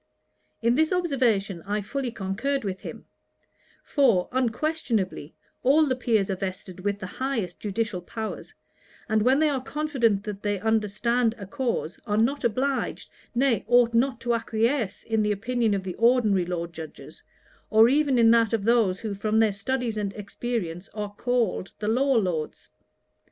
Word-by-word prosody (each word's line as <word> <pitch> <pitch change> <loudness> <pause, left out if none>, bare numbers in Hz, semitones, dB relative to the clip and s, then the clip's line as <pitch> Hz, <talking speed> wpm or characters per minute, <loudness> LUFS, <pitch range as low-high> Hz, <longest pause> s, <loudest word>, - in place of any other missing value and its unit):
In 235 +1 +4
this 315 +4 +2
observation 245 - +1
I 205 +4 -2
fully 265 +5 -3
concurred 230 +7 -2
with 190 -2 -3
him; - - -9 0.8
for, 235 - +2
unquestionably, 240 - -1 0.3
all 295 +5 +5
the 260 -3 0
Peers 220 -6 +1
are - - 0
vested 185 -1 -6
with 200 +2 -1
the 190 - -7
highest 225 -4 -3
judicial 210 -2 -2
powers; 220 +5 -6 0.5
and 220 0 +2
when 255 +5 +4
they 310 +1 +3
are 275 -3 0
confident 260 -8 0
that 210 -3 -6
they 205 -1 -1
understand 225 +2 +1
a 200 - -7
cause, 235 - -3
are 210 0 0
not 265 +6 +1
obliged, 260 +4 -1 0.2
nay 245 -3 +2
ought 240 -1 +4
not 240 +1 +2
to 240 0 0
acquiesce 225 -1 0
in 225 -1 0
the 210 0 +1
opinion 225 +1 0
of 195 - -3
the 185 -1 -4
ordinary 225 -6 +3
Law 175 -1 -2
Judges, 160 -2 -10 0.5
or 220 +1 +6
even 280 0 +3
in 230 -1 +6
that 230 -1 +3
of 220 -3 0
those 220 -5 +2
who 220 -3 -3
from 215 +2 -1
their 220 -1 +4
studies 230 +2 -2
and 200 -2 -2
experience 200 -4 -4
are 210 -1 -4
called 235 -4 -1
the 210 - -4
Law 265 +5 +2
Lords. 180 -8 -2
225 Hz, 160 wpm, -26 LUFS, 200-250 Hz, 0.8 s, or